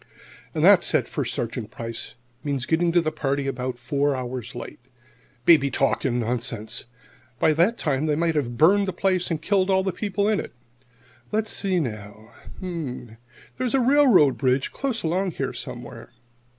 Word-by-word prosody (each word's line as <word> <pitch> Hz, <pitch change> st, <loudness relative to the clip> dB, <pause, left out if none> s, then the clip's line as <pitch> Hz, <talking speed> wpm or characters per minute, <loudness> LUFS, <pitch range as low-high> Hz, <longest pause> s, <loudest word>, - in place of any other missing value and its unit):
"And -, -, +2 dB
that," -, -, +7 dB
said -, -, +2 dB
First -, -, -3 dB
Sergeant 115 Hz, -2 st, -4 dB
Price, 115 Hz, -1 st, -6 dB, 0.3 s
"means 140 Hz, -3 st, -2 dB
getting 170 Hz, +3 st, +2 dB
to 175 Hz, 0 st, +4 dB
the 155 Hz, -1 st, -1 dB
party 140 Hz, -2 st, -1 dB
about 130 Hz, -2 st, -3 dB
four 140 Hz, +3 st, 0 dB
hours 125 Hz, -2 st, -5 dB
late. -, -, -8 dB, 0.7 s
Baby 150 Hz, -5 st, +6 dB
talk 135 Hz, +2 st, 0 dB
and 125 Hz, -2 st, +1 dB
nonsense! 115 Hz, -1 st, -3 dB, 0.5 s
By 155 Hz, -, +3 dB
that 180 Hz, +9 st, +2 dB
time 145 Hz, 0 st, 0 dB
they 150 Hz, -, +2 dB
might 165 Hz, +1 st, +1 dB
have 120 Hz, -6 st, -2 dB
burned 195 Hz, +8 st, +4 dB
the 190 Hz, -, -2 dB
place 185 Hz, -2 st, 0 dB
and 165 Hz, -3 st, -1 dB
killed 190 Hz, +3 st, +1 dB
all 190 Hz, 0 st, +3 dB
the 190 Hz, -, 0 dB
people 200 Hz, +1 st, -1 dB
in 215 Hz, -2 st, +2 dB
it. -, -, -7 dB, 0.8 s
Let's 215 Hz, 0 st, +1 dB
see, 190 Hz, -3 st, 0 dB
now: 110 Hz, -4 st, -6 dB, 1.2 s
there's 255 Hz, 0 st, 0 dB
a -, -, +4 dB
railroad 250 Hz, -, +5 dB
bridge 130 Hz, 0 st, +1 dB
close 265 Hz, -4 st, -3 dB
along 180 Hz, +2 st, 0 dB
here, -, -, -3 dB
somewhere." -, -, -8 dB
150 Hz, 165 wpm, -24 LUFS, 125-190 Hz, 1.2 s, that